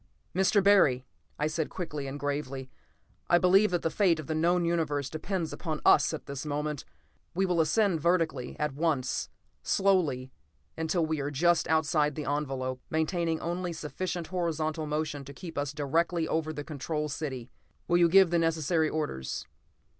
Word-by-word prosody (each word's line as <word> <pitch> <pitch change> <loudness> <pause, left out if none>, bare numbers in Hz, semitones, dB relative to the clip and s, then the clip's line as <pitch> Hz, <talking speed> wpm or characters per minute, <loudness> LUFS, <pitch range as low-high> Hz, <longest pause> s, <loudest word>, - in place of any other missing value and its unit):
"Mr. 190 +2 +3
Barry," 150 -11 +5 0.3
I 150 - 0
said 155 0 -1
quickly 150 -6 -5
and 140 +2 -5
gravely, 135 -2 -3 0.6
"I 175 - +6
believe 190 +4 +5
that 175 -1 -1
the 165 - 0
fate 175 -5 +3
of 155 - -6
the 160 - -2
known 170 +2 +2
Universe 150 -5 0
depends 165 +1 -3
upon 155 -4 -4
us 140 - +6
at 160 - -6
this 140 -1 -5
moment. 150 -1 -3 0.5
We 190 +2 +2
will 175 -3 +2
ascend 175 +1 +2
vertically, 165 -6 0
at 150 -2 -1
once 145 -4 -1 0.3
slowly 160 -10 +1 0.4
until 160 +1 0
we 155 -1 -1
are 140 0 -2
just 170 +4 +2
outside 150 -2 +2
the 150 - -4
envelope, 135 -3 -2
maintaining 160 0 0
only 175 +1 -2
sufficient 170 +2 -4
horizontal 160 -3 -2
motion 150 -1 -2
to 140 +1 -11
keep 170 -3 -8
us 145 -1 -1
directly 160 +3 0
over 160 -1 -1
the 145 -1 -5
Control 150 0 -3
City. 135 -5 -5 0.4
Will 175 0 +3
you 170 -1 +5
give 190 0 +6
the 170 - +3
necessary 165 0 +1
orders?" 150 - -3
155 Hz, 165 wpm, -29 LUFS, 145-170 Hz, 0.6 s, I